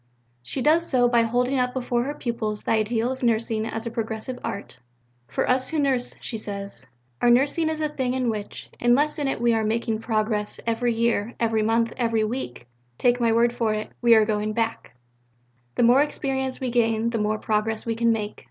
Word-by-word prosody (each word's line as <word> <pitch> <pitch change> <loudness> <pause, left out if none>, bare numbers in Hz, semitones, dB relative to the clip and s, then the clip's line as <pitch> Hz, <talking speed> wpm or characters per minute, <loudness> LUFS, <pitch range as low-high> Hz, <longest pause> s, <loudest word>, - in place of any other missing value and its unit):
She 250 - -4
does 330 +3 +3
so 245 -2 +4
by 240 -1 +4
holding 245 +3 +1
up 250 0 0
before 245 -1 0
her 290 +2 -3
pupils 230 -5 -3
the - - -1
ideal 225 +2 +1
of 260 - -6
nursing 225 -2 0
as 225 +1 -5
a 235 - -3
progressive 225 +2 -4
art. 200 -10 -5 0.5
"For - - -1
us 255 0 +1
who 320 - -2
nurse," 270 -4 +1
she 225 - -5
says, 200 - -6 0.3
"our - - +4
nursing 280 +7 +3
is 315 0 -2
a 305 - +2
thing 260 -4 -2
in 250 -3 +1
which, 210 -2 -7
unless 280 +6 +3
in 285 - 0
it 270 - -1
we 235 0 +3
are 225 -1 +1
making 225 0 -1
progress 215 -2 -1
every 230 +1 0
year, 230 -1 0
every 225 -2 +1
month, 230 +1 +1
every 230 -3 +1
week, 215 - -4 0.3
take 245 0 +2
my 230 -1 +3
word 235 +1 +3
for 225 -3 0
it, 215 - -5
we 235 -1 +6
are 220 -1 +5
going 210 0 -1
back. 225 - -2 0.8
The - - +2
more 245 +4 +6
experience 265 -3 -2
we 255 -2 -2
gain, 230 -1 +1
the 230 - -1
more 210 +1 0
progress 215 +1 -1
we 230 - 0
can 230 +1 +2
make. 215 -2 -3
235 Hz, 205 wpm, -24 LUFS, 220-250 Hz, 0.8 s, we